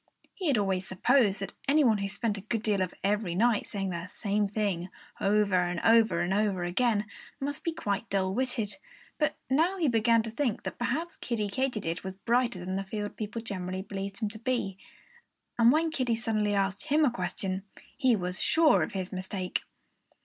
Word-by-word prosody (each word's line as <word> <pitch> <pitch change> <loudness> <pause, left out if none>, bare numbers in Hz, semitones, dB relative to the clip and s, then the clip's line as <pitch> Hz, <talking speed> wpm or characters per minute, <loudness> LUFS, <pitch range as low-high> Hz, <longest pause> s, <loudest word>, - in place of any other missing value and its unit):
He 370 - -3
had 275 -5 +3
always 190 -2 0
supposed 205 0 +3
that 195 - -4
any 295 +2 +5
one 220 -5 +4
who 200 - -1
spent 210 +2 -1
a 200 - -6
good 220 +2 -2
part 205 -3 +1
of 185 -1 -2
every 200 -3 0
night 230 +2 +2
saying 195 -2 -3
the 170 0 -4
same 205 0 0
thing 195 -4 -1 0.3
over 205 0 +2
and 175 -1 0
over 225 -6 +5
and 175 +2 0
over 200 -3 +1
again 210 +4 +1 0.3
must 280 +1 -3
be 335 - 0
quite 210 - -2
dull 190 -1 0
witted. 240 -2 -1 0.4
But 300 - +1
now 325 +8 +2
he 335 -4 +2
began 230 -1 +3
to 225 - -5
think 240 -2 -1
that - - -5
perhaps 300 +8 -2
Kiddie 215 -4 -2
Katydid 215 -10 -1
was 190 0 -5
brighter 235 +2 +1
than 185 +2 -3
the 195 - -2
field 205 +1 -4
people 220 +1 -5
generally 185 -3 -3
believed 195 0 -5
him 215 -3 -1
to 220 - -10
be. 235 -5 -1 0.8
And 235 +1 +7
when 320 +3 +2
Kiddie 255 -7 +1
suddenly 215 -3 0
asked 195 0 0
him 300 +2 +4
a 260 - +3
question, 190 -1 -3 0.3
he 260 -4 +3
was 180 -2 -3
sure 320 -2 +5
of - - -2
his 190 -1 -4
mistake. 185 0 -3
210 Hz, 195 wpm, -29 LUFS, 190-240 Hz, 0.8 s, And